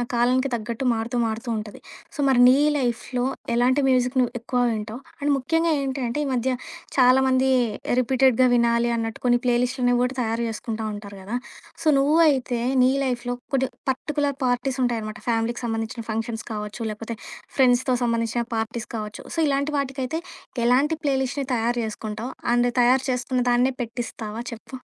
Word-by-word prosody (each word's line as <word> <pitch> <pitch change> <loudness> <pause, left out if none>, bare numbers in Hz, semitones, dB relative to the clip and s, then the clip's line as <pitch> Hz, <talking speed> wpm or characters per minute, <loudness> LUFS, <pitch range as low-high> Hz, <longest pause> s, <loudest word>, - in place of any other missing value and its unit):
ఆ - - +1
కాలానికి 250 +3 +2
తగ్గట్టు 230 +2 -3
మారుతూ 230 +2 -2
మారుతూ 225 +2 -3
ఉంటది. 210 -1 -8 0.4
సో, - - -12
మరి 265 -2 +4
నీ 255 - +7 0.2
లైఫ్‌లో 245 -1 -1 0.3
ఎలాంటి 250 +4 +3
మ్యూజిక్‌ని 255 0 +2
నువ్వు 245 0 0
ఎక్కువ 245 +2 -3
వింటావు? 220 +2 -5 0.2
అండ్ 290 +1 0
ముఖ్యంగా 325 +5 +1
ఏంటి 270 -1 -2
అంటే 235 +5 -3
ఈ - - -3
మధ్య 255 +1 0 0.5
చాలా 255 0 +6
మంది 260 0 +3 0.4
ఆహ్, - - +2
రిపీటెడ్‌గా 255 0 +3
వినాలి 235 0 +3
అన్నట్టు 225 -1 -3
కొన్ని 245 -1 +4
ప్లే 245 -1 +3
లిస్టులు 250 0 +1
కూడా 250 +1 0
తయారు 230 0 -1
చేసుకుంటూ 220 0 -4
ఉంటారు 205 -1 -8
కదా! 210 +6 -3 0.5
సో, - - -9
నువ్వు 285 +3 +3
అయితే 255 -4 0 0.2
నీ 255 - +5
లైఫ్‌లో 245 -1 -2 0.2
కొన్ని 265 -1 +2 0.2
పర్టిక్యులర్ 285 +1 -1
పార్టీస్ 250 +2 0
ఉంటాయన్నమాట. 220 -3 -2
ఫ్యామిలీకి 235 +1 0
సంబంధించిన 225 0 -3
ఫంక్షన్స్ 225 +1 -3
కావచ్చు, 210 +1 -5
లేకపోతే 225 +2 -6 0.4
ఫ్రెండ్స్‌తో 255 -1 +4
సంబంధించిన 230 0 0
పార్టీస్ 225 +1 -3
కావచ్చు. 210 -1 -6
సో, - - -7
ఇలాంటి 280 +1 0
వాటికైతే 270 +2 -2 0.5
ఎలాంటి 275 +6 +3
ప్లే 280 -2 +2
లిస్ట్‌ని 275 +1 -3
తయారు 240 +1 0
చేసుకుంటావు? 220 +3 -5 0.2
అండ్ 240 0 +3
తయారు 255 +2 +4
చేసుకున్న 250 0 0
దాన్నే 245 +2 +3
పెట్టిస్తావా? 230 -2 -5
చెప్పు 235 +3 -9
245 Hz, 160 wpm, -24 LUFS, 230-260 Hz, 0.5 s, నీ